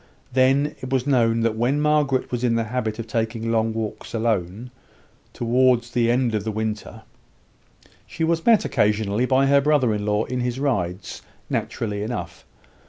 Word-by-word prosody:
Then, 135 +3 +3
it 130 - -6
was 130 -1 0
known 115 -5 +2
that 115 -1 +1
when 125 +6 +1
Margaret 150 -3 +1
was 120 0 -2
in 120 -2 +2
the 115 - +1
habit 110 -1 -3
of 115 - -5
taking 115 0 -2
long 115 0 +1
walks 110 +1 -5
alone, 110 +1 -2 0.6
towards 120 0 +2
the 120 -1 +1
end 120 -1 +1
of 105 -2 -1
the 110 - -2
winter, 110 0 -4 1.0
she 165 - -4
was 165 0 +1
met 230 -3 +4
occasionally 105 +3 +1
by 135 +1 +3
her 140 0 +4
brother 140 -6 +2
in 105 -1 -2
law 105 +1 +1
in 125 0 -3
his 125 +1 -2
rides 95 -10 -2 0.3
naturally 105 -3 -2
enough. 105 -6 -5
120 Hz, 170 wpm, -23 LUFS, 110-130 Hz, 1.0 s, met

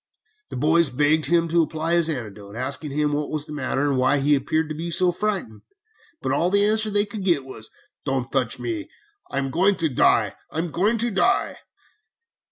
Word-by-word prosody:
"The - - -7
boys 155 +4 +3
begged 145 +3 +2
him 170 +1 +2
to 170 +1 +3
apply 160 +1 -1
his 170 -1 +3
antidote, 105 -7 -6
asking 130 +5 -2
him 150 +1 0
what 145 0 -2
was 150 -1 -3
the 150 - -9
matter 140 0 -1
and 135 -2 +1
why 130 +3 +3
he 145 +2 +2
appeared 155 +3 0
to - - -3
be 165 +3 -5
so 175 +2 +2
frightened, 190 - -3 0.6
but - - -1
all 165 +6 +1
the 200 +1 +4
answer 215 +1 +1
they 205 0 +2
could 205 -1 -7
get 170 -8 +1
was, 110 -4 -10 0.4
'Don't 135 -2 -2
touch 130 -4 0
me. 325 -3 -4 0.4
I 140 - -5
am 135 -1 -1
going 190 +6 +3
to 165 -3 0
die! 125 - +3 0.2
I'm 165 +1 -3
going 205 +9 +1
to 235 +1 +1
die!' 235 +5 +1
155 Hz, 200 wpm, -23 LUFS, 135-180 Hz, 0.6 s, the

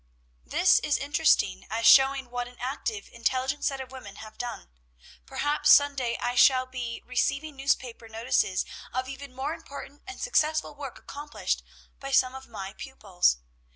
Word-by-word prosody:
"This - - +4
is - - +1
interesting, 60 +1 +2
as 230 - -2
showing 270 -2 +6
what 245 0 -3
an 245 0 -15
active, 235 -5 -3
intelligent 260 +4 -1
set 275 -1 0
of 260 -1 -7
women 255 -7 -10
have 215 +1 -11
done. 240 - -6 0.6
"Perhaps 295 +1 +2
some 285 0 +6
day 240 -3 -1
I 245 - -2
shall 255 +1 +5
be 250 -2 -6
receiving 275 +4 -1
newspaper 255 -4 -1
notices 220 -4 0 0.3
of 255 0 -2
even 270 +1 -8
more 275 +4 -2
important 285 -3 -10
and 260 - -8
successful 310 +4 +1
work 280 -3 -8
accomplished 290 +1 -4 0.4
by 275 - -6
some 260 -1 +3
of 265 0 -10
my 195 -4 -7
pupils. 195 - 0
255 Hz, 155 wpm, -27 LUFS, 235-275 Hz, 0.6 s, showing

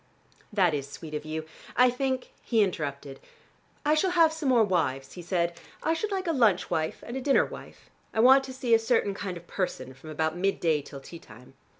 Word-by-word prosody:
"That 185 -6 +3
is 140 -1 -3
sweet 155 +1 -9
of 150 0 -4
you. 155 0 -4 0.3
I 250 0 +6
think 260 0 -2
" - - -33
He 225 -3 +3
interrupted. 140 -6 -4 0.7
"I 300 - +4
shall 310 +5 +2
have 335 -3 +4
some 315 -4 -2
more 240 -3 +5
wives," 135 -9 -1
he 180 - -8
said. 170 -1 -1 0.3
"I 320 - +2
should 410 +6 -2
like 385 -1 -2
a 335 - +1
lunch 225 - +2
wife 160 0 -2
and 240 - -6
a 265 - -3
dinner 275 +1 +4
wife. - - -12 0.2
I - - -3
want 265 +3 +7
to 265 - -7
see 255 -2 0
a 225 - +7
certain 225 -3 +1
kind 195 -2 -5
of 170 - -13
person 130 -9 -3
from 135 +4 -13
about 160 +1 -1
mid 195 +2 0
day 160 -3 +2
till 140 -1 -10
tea 170 +4 -10
time." 125 -3 -16
190 Hz, 225 wpm, -28 LUFS, 155-255 Hz, 0.7 s, want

